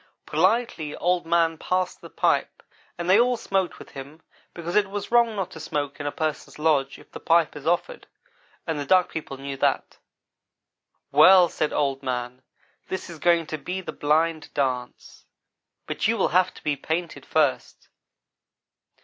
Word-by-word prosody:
Politely, 200 -11 0
Old 175 -1 0
man 165 -1 +2
passed 185 0 -1
the - - -11
pipe, - - 0 0.3
and 170 - -4
they 190 +4 +6
all 245 0 +3
smoked 195 -4 -1
with - - -13
him 140 +4 -10 0.3
because 170 0 -6
it 210 -2 +4
is 205 +2 -6
wrong 235 -2 +4
not 190 -2 -3
to 160 - -10
smoke 145 -2 -3
in 145 - -3
a - - -1
person's 155 0 -4
lodge 150 -3 +1
if - - -18
the - - -8
pipe 165 -2 +2
is 150 +1 -8
offered, 175 - -1 0.6
and 160 -3 -2
the 145 - -3
Duck 185 +2 +4
people 150 -4 -6
knew 135 0 -6
that. - - -1 1.1
"'Well,' 185 -2 +7
said 155 - -1
Old 135 -2 0
man, 125 -1 -4 0.5
'this 190 -2 -5
is 165 - -10
going 170 0 +3
to 155 0 -5
be 180 +5 -4
the 185 - -6
Blind 155 +2 0
dance, 125 -3 -3 0.6
but - - -1
you 230 +1 +1
will 195 - +2
have 185 +2 +3
to - - -14
be 150 -1 0
painted 160 +4 -4
first. 150 -4 -1
165 Hz, 170 wpm, -25 LUFS, 145-185 Hz, 1.1 s, Well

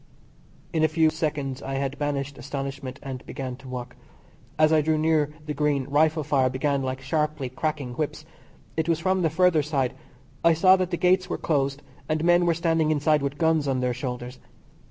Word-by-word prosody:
In 160 -1 +2
a - - +6
few 160 0 +3
seconds 150 -4 -3
I 135 0 -2
banished 140 0 -3
astonishment 135 0 -5
and 130 -2 -6
began 130 -2 -5
to 130 - -13
walk. 125 -1 -6 0.6
As 155 0 +4
I 155 - +5
drew 155 +1 +1
near 155 -1 +2 0.2
the 150 - -3
Green 145 -2 +1
rifle 155 +2 +2
fire 135 -3 +2
began 140 +2 0
like 130 0 -3
sharply 150 0 -1
cracking 140 -1 -3
whips. 155 +2 -3 0.5
It 160 +1 -1
was 165 - +3
from 185 +3 +1
the 165 - +2
further 170 0 +3
side. 140 -4 -1 0.5
I 170 0 +6
saw 185 +4 +6
that 185 -1 -1
the 175 - -2
Gates 185 +1 +2
were - - -2
closed 140 -2 -1 0.3
and 155 0 0
men 175 0 +4
were 170 - +3
standing 165 -1 +1
inside 150 0 +2
with 140 +1 -3
guns 160 -2 +2
on 130 -1 +1
their 125 -1 0
shoulders. 125 0 -5
150 Hz, 190 wpm, -25 LUFS, 135-160 Hz, 0.6 s, a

